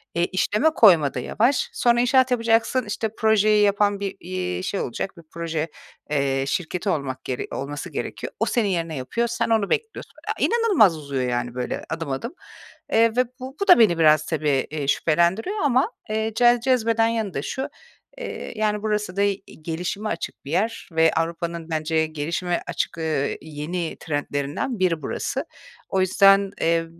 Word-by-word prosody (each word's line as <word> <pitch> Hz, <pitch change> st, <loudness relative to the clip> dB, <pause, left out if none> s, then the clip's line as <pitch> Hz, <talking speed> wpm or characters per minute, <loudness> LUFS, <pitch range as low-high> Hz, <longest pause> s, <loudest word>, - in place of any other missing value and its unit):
E, 170 Hz, 0 st, +2 dB
işleme 210 Hz, -, +1 dB
koyma 175 Hz, -, +5 dB
da -, -, -3 dB
yavaş. 240 Hz, -, +1 dB
Sonra, 240 Hz, 0 st, +3 dB
inşaat 255 Hz, +1 st, +3 dB
yapacaksın, 230 Hz, +1 st, +2 dB
işte, 215 Hz, +1 st, -2 dB
projeyi 215 Hz, -1 st, +4 dB
yapan 205 Hz, 0 st, +2 dB
bir, 195 Hz, -1 st, -3 dB
iii, 180 Hz, 0 st, -4 dB
şey 195 Hz, +1 st, -2 dB
olacak, 180 Hz, +10 st, -4 dB
bir 170 Hz, -, -13 dB
proje, 165 Hz, -1 st, -3 dB, 0.4 s
eee, 135 Hz, -2 st, +1 dB
şirketi 180 Hz, +5 st, -2 dB
olmak 140 Hz, -6 st, -2 dB
gere 125 Hz, -2 st, -4 dB
olması 145 Hz, +2 st, -5 dB
gerekiyor. -, -, -5 dB
O -, -, +2 dB
senin 230 Hz, -4 st, +1 dB
yerine 165 Hz, -3 st, -2 dB
yapıyor, 230 Hz, -, -1 dB
sen 235 Hz, 0 st, -1 dB
onu 220 Hz, -3 st, +2 dB
bekliyorsun. 450 Hz, 0 st, -3 dB, 0.3 s
E, -, -, +1 dB
inanılmaz 400 Hz, -, +4 dB
uzuyor, 140 Hz, -3 st, -3 dB
yani 120 Hz, 0 st, -2 dB
böyle, 125 Hz, -1 st, -3 dB
adım 160 Hz, -3 st, -4 dB
adım. 235 Hz, -, -4 dB, 0.6 s
Eee, 230 Hz, +1 st, +5 dB
ve 250 Hz, +1 st, +3 dB
bu 260 Hz, +2 st, -8 dB
bu 400 Hz, -, 0 dB
da 360 Hz, -, +8 dB
beni 180 Hz, -7 st, +5 dB
biraz, 155 Hz, -1 st, +5 dB
tabii, 155 Hz, -2 st, -1 dB, 0.2 s
eee, 150 Hz, -2 st, -4 dB
şüphelendiriyor 175 Hz, -, +1 dB
ama, 275 Hz, -, +2 dB, 0.2 s
eee, 220 Hz, +1 st, -1 dB
ce 240 Hz, 0 st, +5 dB
cezbeden 230 Hz, -3 st, +2 dB
yanında 215 Hz, -10 st, -2 dB
şu; 265 Hz, -, -4 dB, 0.5 s
eee, -, -, -6 dB
yani 210 Hz, -1 st, 0 dB
burası 210 Hz, -3 st, -1 dB
da -, -, +2 dB
i 200 Hz, -1 st, 0 dB, 0.2 s
gelişime 180 Hz, +6 st, -3 dB
açık -, -, -5 dB
bir 140 Hz, -, -7 dB
yer 220 Hz, +7 st, -1 dB
ve 160 Hz, 0 st, +4 dB
Avrupa'nın 170 Hz, 0 st, -3 dB
bence 160 Hz, 0 st, 0 dB
gelişime 165 Hz, +3 st, -2 dB
açık, -, -, -2 dB
eee, 155 Hz, -3 st, -1 dB
yeni 160 Hz, +3 st, -4 dB
trendlerinden 145 Hz, -, -3 dB
biri 170 Hz, -4 st, +1 dB
burası. -, -, -3 dB, 0.4 s
O 190 Hz, -, +1 dB
yüzden, 195 Hz, +1 st, +5 dB
eee, 165 Hz, 0 st, +2 dB
185 Hz, 165 wpm, -23 LUFS, 155-225 Hz, 0.6 s, da